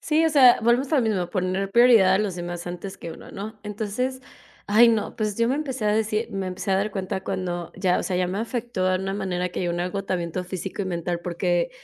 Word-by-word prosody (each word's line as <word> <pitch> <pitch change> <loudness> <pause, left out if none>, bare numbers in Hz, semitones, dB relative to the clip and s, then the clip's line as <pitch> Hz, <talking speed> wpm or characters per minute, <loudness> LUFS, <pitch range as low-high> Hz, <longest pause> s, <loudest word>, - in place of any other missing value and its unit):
Sí, 320 +1 +2
o - - +4
sea, 270 -6 +7
volvemos 245 +5 +2
a - - +5
lo 265 - +3
mismo, 200 -6 0
poner 185 +1 -1
prioridad 230 -4 +6
a 190 - +3
los 200 -4 -1
demás 175 0 -5
antes 180 +2 -6
que 170 - -8
uno, - - -11
¿no? 215 +2 -7
Entonces, 220 +5 -3 0.5
ay, 225 +4 +6
no, 225 0 0
pues 215 -3 -2
yo 230 0 +2
me 265 - +2
empecé 265 -6 -3
a 210 - +3
decir 220 +1 0
me 195 -1 -3
empecé 185 +2 -4
a 190 - +4
dar 200 +2 0
cuenta 190 -1 -3
cuando 175 -3 -3
ya, 185 -1 +1
o - - -2
sea, 185 - -2
ya 180 - +1
me 190 +2 -3
afectó 230 -4 -2
a 185 - +2
una 195 +1 -3
manera 180 -3 -2
que 180 - -5
llegó 175 -1 -1
un 175 - -2
agotamiento 180 -1 -2
físico 185 +2 -5
y - - -3
mental 175 -1 -3
porque 175 0 0
195 Hz, 245 wpm, -24 LUFS, 180-220 Hz, 0.5 s, sea